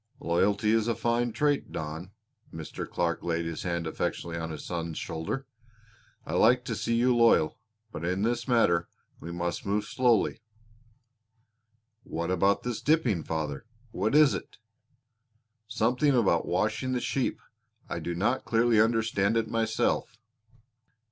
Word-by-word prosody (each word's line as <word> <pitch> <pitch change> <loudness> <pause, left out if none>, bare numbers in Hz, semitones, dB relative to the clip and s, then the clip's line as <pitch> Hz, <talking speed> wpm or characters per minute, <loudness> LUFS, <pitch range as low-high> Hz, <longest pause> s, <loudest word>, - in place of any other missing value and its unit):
"Loyalty 100 +5 +1
is 110 0 +2
a 115 - +1
fine 120 +2 0
trait, 145 +3 0
Don." 80 +4 -5 0.4
Mr. 80 -1 -7
Clark 85 -1 -1
laid 85 -1 -1
his 80 -1 -4
hand 85 -2 -2
affectionately 85 +1 -3
on 80 0 -4
his 80 -2 -7
son's 85 -2 -4
shoulder. 80 +13 -4 0.8
"I 80 - -5
like 120 +7 +4
to 115 -4 -2
see 115 +2 -1
you 125 +1 +3
loyal. 115 -9 +4 0.3
But 80 - -6
in 90 +3 -1
this 120 +3 -1
matter 85 -9 +3 0.3
we 85 - -7
must 85 0 -3
move 105 +1 -1
slowly." 120 -2 +2 1.6
"What 85 -8 -4
about 95 +2 +2
this 120 -3 -3
dipping, 135 - +2
father? 80 +3 -4 0.2
What 110 +8 0
is 150 -5 +6
it?" 95 - -7 1.1
"Something 125 +6 +2
about 95 -8 +2
washing 110 +8 0
the 125 - 0
sheep. 130 +1 -1 0.5
I - - -4
do 85 - -4
not 115 +9 0
clearly 115 -1 +3
understand 110 -2 +2
it 115 -1 0
myself." 115 0 0
105 Hz, 140 wpm, -28 LUFS, 85-120 Hz, 1.6 s, is